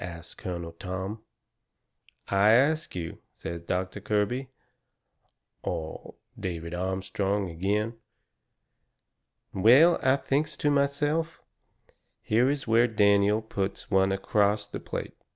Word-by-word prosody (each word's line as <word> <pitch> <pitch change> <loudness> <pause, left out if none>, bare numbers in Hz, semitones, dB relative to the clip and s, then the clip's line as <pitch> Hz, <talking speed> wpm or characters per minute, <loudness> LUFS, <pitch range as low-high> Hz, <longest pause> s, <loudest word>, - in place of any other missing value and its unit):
asts 85 -1 -8
Colonel 85 -2 -6
Tom. 95 +3 -5 1.1
"I 100 +2 +4
ask 150 +4 +2
you," 85 -2 -5 0.2
says 85 0 -6
Doctor 90 +3 -3
Kirby 110 +6 -1 1.1
or 80 -1 -5 0.2
David 85 -2 -4
Armstrong 95 +1 -2
agin. 105 +6 -1 1.6
Well, 130 - +6
I 130 +1 +4
thinks 140 +2 -1
to 145 - +1
myself, 145 +3 0 0.8
here 120 +4 +3
is 145 -1 -2
where 115 +1 +4
Daniel 105 0 +3
puts 100 -3 -4
one 95 0 +3
acrost 100 +1 +1
the - - -4
plate. - - -5
105 Hz, 105 wpm, -27 LUFS, 95-125 Hz, 1.6 s, Well